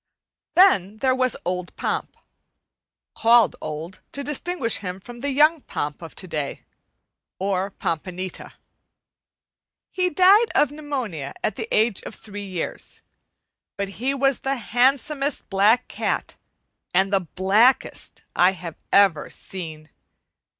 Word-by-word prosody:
Then 215 Hz, -, +5 dB
there 260 Hz, +3 st, +2 dB
was 255 Hz, -1 st, +1 dB
old 180 Hz, 0 st, -3 dB
Pomp, -, -, -3 dB, 1.0 s
called 230 Hz, -3 st, +5 dB
"old" 155 Hz, +4 st, -6 dB
to 280 Hz, -, -3 dB
distinguish 295 Hz, -3 st, 0 dB
him 185 Hz, -1 st, -6 dB
from 240 Hz, +5 st, -11 dB
the 285 Hz, +3 st, -2 dB
young 305 Hz, +3 st, +4 dB
Pomp 150 Hz, -, -4 dB
of 165 Hz, -, -10 dB
to 185 Hz, -, -8 dB
day, 150 Hz, -5 st, -4 dB, 0.7 s
or 195 Hz, 0 st, -1 dB
"Pompanita." 185 Hz, +1 st, -4 dB, 1.4 s
He 365 Hz, -1 st, +1 dB
died 385 Hz, +7 st, +5 dB
of 290 Hz, -, +4 dB
pneumonia 255 Hz, -, -4 dB
at 215 Hz, -, 0 dB
the 225 Hz, -, -4 dB
age 220 Hz, -1 st, +2 dB
of -, -, -9 dB
three 205 Hz, -2 st, -8 dB
years; 180 Hz, -3 st, -5 dB, 0.7 s
but 200 Hz, -1 st, -2 dB
he 270 Hz, +2 st, +1 dB
was 275 Hz, -1 st, +2 dB
the 270 Hz, +1 st, -1 dB
handsomest 270 Hz, +4 st, +1 dB
black 210 Hz, +6 st, +4 dB
cat -, -, -2 dB, 0.6 s
and 195 Hz, +2 st, +3 dB
the 195 Hz, -, +5 dB, 0.2 s
blackest 205 Hz, +7 st, +2 dB
I 180 Hz, +2 st, +5 dB
have 175 Hz, -3 st, -8 dB
ever 195 Hz, -7 st, +4 dB
seen. 160 Hz, -4 st, -7 dB
210 Hz, 125 wpm, -23 LUFS, 185-270 Hz, 1.4 s, Then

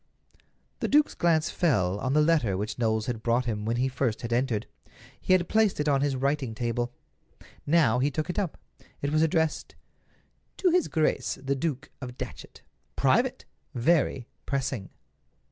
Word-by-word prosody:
The -, -, -1 dB
duke's 300 Hz, +1 st, +3 dB
glance 165 Hz, -2 st, +2 dB
fell 100 Hz, -, +1 dB
on 130 Hz, +3 st, -1 dB
the 150 Hz, +1 st, +4 dB
letter 150 Hz, -, +2 dB
which 105 Hz, +4 st, -4 dB
Knowles 110 Hz, -2 st, +1 dB
had 120 Hz, -3 st, -3 dB
brought 120 Hz, +2 st, +1 dB
him 105 Hz, -3 st, -3 dB
when 115 Hz, +1 st, 0 dB
he 125 Hz, +2 st, +1 dB
first 125 Hz, -4 st, -2 dB
had 115 Hz, 0 st, -2 dB
entered. 120 Hz, -3 st, 0 dB, 0.6 s
He -, -, +2 dB
had 180 Hz, -2 st, +3 dB
placed 220 Hz, -5 st, +2 dB
it 150 Hz, -, 0 dB
on 140 Hz, -2 st, +3 dB
his 140 Hz, -1 st, +1 dB
writing 135 Hz, -3 st, -1 dB
table. 120 Hz, +1 st, -2 dB, 0.8 s
Now 140 Hz, -7 st, +4 dB
he 140 Hz, +3 st, +2 dB
took 155 Hz, +2 st, -3 dB
it 180 Hz, -, -2 dB
up. 190 Hz, -6 st, -2 dB, 0.5 s
It 140 Hz, -, 0 dB
was 155 Hz, +1 st, +2 dB
addressed: 160 Hz, -1 st, 0 dB, 0.8 s
"To 370 Hz, -2 st, +3 dB
His 360 Hz, 0 st, +3 dB
Grace 155 Hz, -1 st, 0 dB
the 135 Hz, +1 st, -1 dB
Duke 140 Hz, -1 st, -3 dB
of 125 Hz, -1 st, -7 dB
Datchet. -, -, -8 dB, 0.3 s
Private! -, -, +2 dB, 0.3 s
VERY 130 Hz, -1 st, +2 dB, 0.2 s
PRESSING!!!" 130 Hz, -7 st, -2 dB
135 Hz, 165 wpm, -27 LUFS, 120-155 Hz, 0.8 s, the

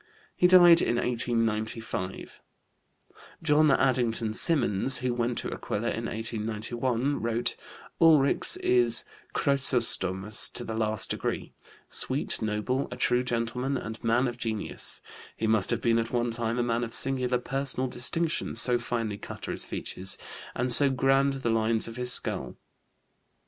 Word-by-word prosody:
He 180 Hz, -, +4 dB
died 175 Hz, -2 st, +7 dB
in 120 Hz, -, 0 dB
1895. 115 Hz, -5 st, -3 dB, 1.0 s
John 155 Hz, -1 st, +3 dB
Addington 120 Hz, -5 st, +1 dB
Symonds, 130 Hz, -, +4 dB
who 125 Hz, -1 st, -2 dB
went 120 Hz, 0 st, -2 dB
to -, -, -2 dB
Aquila 115 Hz, +3 st, -3 dB
in 115 Hz, -, -4 dB
1891, 115 Hz, +4 st, -2 dB
wrote: 115 Hz, +1 st, -1 dB, 0.5 s
"Ulrichs 155 Hz, -4 st, +4 dB
is 120 Hz, -2 st, +3 dB, 0.3 s
chrysostomos 110 Hz, -7 st, +1 dB
to 120 Hz, -, -5 dB
the 115 Hz, -, -6 dB
last 110 Hz, -1 st, -2 dB
degree, -, -, -4 dB, 0.3 s
sweet, -, -, -1 dB
noble, 110 Hz, +5 st, -2 dB
a 125 Hz, -, -8 dB
true 125 Hz, 0 st, +1 dB
gentleman 125 Hz, +3 st, -2 dB
and 115 Hz, -2 st, -8 dB
man 120 Hz, +3 st, +2 dB
of 120 Hz, 0 st, -6 dB
genius. 110 Hz, -3 st, -2 dB, 0.4 s
He 110 Hz, -, -2 dB
must 110 Hz, -3 st, +1 dB
have 120 Hz, -2 st, 0 dB
been 115 Hz, -1 st, +2 dB
at 115 Hz, 0 st, -3 dB
one 120 Hz, -1 st, -1 dB
time 115 Hz, 0 st, -3 dB
a 120 Hz, -, +1 dB
man 120 Hz, 0 st, -1 dB
of 115 Hz, -, -3 dB
singular 130 Hz, -2 st, 0 dB
personal 135 Hz, +1 st, -1 dB
distinction, 155 Hz, +7 st, -1 dB
so 120 Hz, +1 st, +3 dB
finely 115 Hz, -4 st, -4 dB
cut -, -, -9 dB
are -, -, -3 dB
his -, -, -3 dB
features, 95 Hz, +1 st, -5 dB, 0.4 s
and 125 Hz, 0 st, +3 dB
so 140 Hz, +3 st, +10 dB
grand 135 Hz, +1 st, +2 dB
the 130 Hz, -4 st, -2 dB
lines 110 Hz, 0 st, +1 dB
of 115 Hz, +1 st, -9 dB
his 125 Hz, 0 st, +1 dB
skull." -, -, 0 dB
120 Hz, 145 wpm, -27 LUFS, 115-130 Hz, 1.0 s, so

